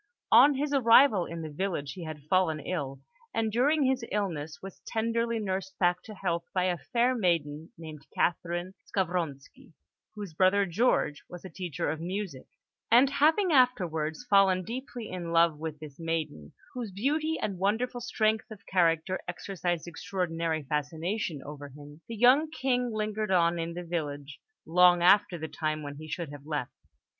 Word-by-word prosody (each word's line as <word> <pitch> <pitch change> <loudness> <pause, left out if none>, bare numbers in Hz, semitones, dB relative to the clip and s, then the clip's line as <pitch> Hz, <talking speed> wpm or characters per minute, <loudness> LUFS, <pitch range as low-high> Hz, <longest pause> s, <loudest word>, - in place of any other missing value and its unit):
On 270 +5 +7
his 290 +2 -1
arrival 230 -6 +5
in 165 0 -6
the 155 - -6
village, 150 -4 -3
he 175 0 -8
had 155 -2 -7
fallen 160 -1 +1
ill, 140 -4 -4 0.3
and 220 -1 0
during 285 +7 +3
his 260 -2 +1
illness 165 -7 -3
was 195 -1 -10
tenderly 230 +1 0
nursed 190 -2 -3
back 180 0 +2
to 215 - -9
health 170 -3 -2
by 185 - +2
a 180 -2 0
fair 245 +1 +1
maiden 165 -8 -1
named 155 -3 -10
Catherine 175 +2 -1
Skavronski, 170 -7 -3 0.4
whose 205 -5 -7
brother, 190 +4 +3
George, 185 -5 +1
was 180 +1 -10
a 190 - -8
teacher 175 -7 -4
of 155 +2 -2
music; 180 -5 -5 0.4
and 250 +4 +6
having 320 +6 +3
afterwards 180 - +2
fallen 195 -3 +4
deeply 240 +1 -6
in 175 -2 -5
love 165 -2 +3
with 155 -1 -5
this 150 -2 -11
maiden, 160 - -4 0.2
whose 245 -4 -4
beauty 300 +11 -1
and 195 -4 -3
wonderful 235 +5 0
strength 220 -2 0
of 215 -3 -12
character 170 0 +1
exercised 175 -2 -3
extraordinary 165 -2 -2
fascination 155 +3 -3
over 145 -1 -8
him, 145 +2 -13
the 230 - -6
young 260 +7 +5
King 250 -5 0
lingered 215 -1 -2
on 170 -2 +3
in 165 0 -4
the 175 - -5
village 145 -4 -5 0.3
long 175 +1 +5
after 195 0 +5
the 160 -1 -5
time 155 -1 -3
when 145 0 -7
he 155 +1 -9
should 155 -1 -4
have 145 0 -11
left. 145 -5 -3
180 Hz, 165 wpm, -29 LUFS, 160-220 Hz, 0.4 s, On